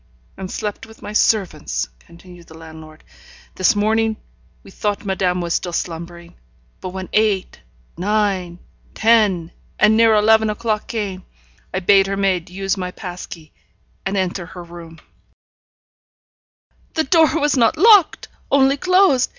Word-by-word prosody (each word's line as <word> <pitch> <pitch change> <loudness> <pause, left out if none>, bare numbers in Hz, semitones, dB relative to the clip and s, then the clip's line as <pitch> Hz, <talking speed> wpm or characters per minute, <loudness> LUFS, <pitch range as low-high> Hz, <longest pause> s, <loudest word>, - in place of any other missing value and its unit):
'And 190 - -7
slept 210 +1 -5
with 220 - -17
my 210 - -7
servants,' 175 - 0
continued 170 - -16
the 160 - -14
landlord. 160 -1 -13 0.5
'This 190 +4 +2
morning 220 +1 +1 0.5
we - - -14
thought 205 +1 -3
madame 185 -2 0
was 170 -1 -2
still 175 - -2
slumbering; 170 0 -6 0.5
but 185 - -6
when 190 0 -7
eight, 210 - 0 0.4
nine, 195 -3 -1 0.4
ten, 210 -7 +2 0.3
and 215 +1 +4
near 225 -1 +5
eleven 220 +1 +4
o'clock 215 0 -2
came, 200 -6 -4 0.5
I 185 - -3
bade 195 +1 +4
her 195 0 -3
maid 190 -4 0
use 195 +2 -2
my 180 -1 -4
pass 180 -1 -8
key, 160 -3 -12 0.5
and 195 +1 -2
enter 180 -2 -2
her 180 -1 -10
room 170 -1 -12 0.9
' - - -44
'The 320 - +2
door 325 +2 +3
was 295 0 +1
not 255 +5 +2
locked, 405 -1 +5 0.2
only 275 0 +3
closed. 365 -6 +3
195 Hz, 140 wpm, -19 LUFS, 175-220 Hz, 0.9 s, near